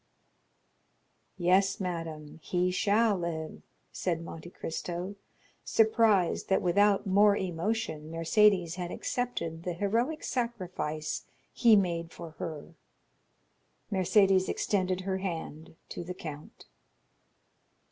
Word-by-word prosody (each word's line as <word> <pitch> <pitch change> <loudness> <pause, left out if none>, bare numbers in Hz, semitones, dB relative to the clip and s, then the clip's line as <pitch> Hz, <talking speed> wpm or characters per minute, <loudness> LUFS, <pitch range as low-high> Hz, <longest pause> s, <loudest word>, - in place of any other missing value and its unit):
"Yes, 190 +2 +3
madame, 165 -5 -5
he 180 +2 0
shall 210 +3 +3
live," 160 -2 -4 0.3
said 170 -2 -2
Monte 165 0 -8
Cristo, 175 +3 -5 0.5
surprised 220 -5 +3
that 190 - +2
without 200 +3 +3
more 200 +1 +5
emotion 180 -2 -2
Mercédès 175 +1 +3
had 175 -1 -3
accepted 170 -9 -3
the 175 +1 -3
heroic 230 - 0
sacrifice 180 -10 -3 0.3
he 230 -3 +6
made 170 -4 0
for 170 -2 -9
her. 160 0 -6 1.2
Mercédès 190 0 +3
extended 185 -2 0
her 190 0 -2
hand 160 -4 -5
to - - -5
the 180 +1 -6
count. 155 -4 -9
180 Hz, 100 wpm, -30 LUFS, 165-205 Hz, 1.2 s, he